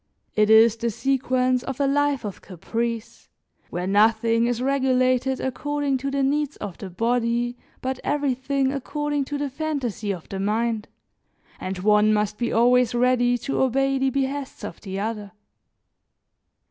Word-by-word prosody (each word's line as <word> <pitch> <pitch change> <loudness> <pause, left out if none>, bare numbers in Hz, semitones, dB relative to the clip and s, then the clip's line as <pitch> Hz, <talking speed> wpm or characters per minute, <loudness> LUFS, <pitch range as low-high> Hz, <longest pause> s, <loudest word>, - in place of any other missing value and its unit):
It 215 0 +3
is 220 +1 +6
the 235 +1 -1
sequence 255 +1 +1
of 270 +1 -6
a 280 - +2
life 280 -2 +1
of 200 - -6
caprice, 230 +5 -4 0.4
where 180 +1 -3
nothing 225 +3 +3
is 240 -1 -1
regulated 260 -1 +1
according 285 +1 -1
to 275 +2 -2
the 275 0 0
needs 290 +1 0
of 200 -4 -7
the 195 - -6
body, 235 +4 0 0.3
but 260 0 -3
everything 275 -1 0
according 290 +1 -2
to 290 +2 -4
the 285 0 -2
fantasy 270 -8 -3
of 180 -5 -6
the 195 - -5
mind 220 +2 -1 0.7
and 190 0 -4
one 210 +3 +4
must 210 0 -1
be 240 - -1
always 245 +1 +3
ready 245 0 +3
to 275 - -2
obey 270 +1 +2
the 265 0 +2
behests 275 +1 -3
of - - -7
the 195 -1 -5
other. 210 -1 -4
245 Hz, 150 wpm, -24 LUFS, 220-270 Hz, 0.7 s, is